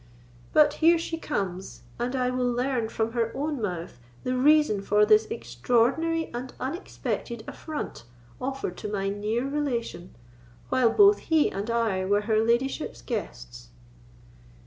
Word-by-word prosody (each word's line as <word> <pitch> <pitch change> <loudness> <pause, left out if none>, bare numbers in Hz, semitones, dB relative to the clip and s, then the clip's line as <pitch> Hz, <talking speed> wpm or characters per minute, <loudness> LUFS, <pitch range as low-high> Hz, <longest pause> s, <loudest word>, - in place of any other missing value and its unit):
But 300 - +5
here 335 +1 +6
she 330 0 -4
comes, 190 - -4 0.2
and 245 +2 -1
I 250 -1 +1
will 250 -1 0
learn 245 -2 -1
from 225 0 -1
her 230 -1 0
own 290 -2 -2
mouth 175 - -4 0.2
the 255 - -1
reason 295 -4 +4
of 210 +1 +3
this 215 +1 +6
extraordinary 245 - 0
and 250 +2 -5
unexpected 260 - -4
affront 305 - -6 0.4
offered 265 -8 -3
to 210 - -5
my 195 -1 -1
near 215 +5 -1
relation, 255 -10 -3 0.5
while 255 -3 +3
both 410 - +6
he 320 -2 +4
and 200 +4 -4
I 225 -5 +1
were 205 +2 +2
her 215 +1 +1
ladyship's 235 - -1
guests." - - -6
235 Hz, 140 wpm, -26 LUFS, 205-275 Hz, 0.5 s, here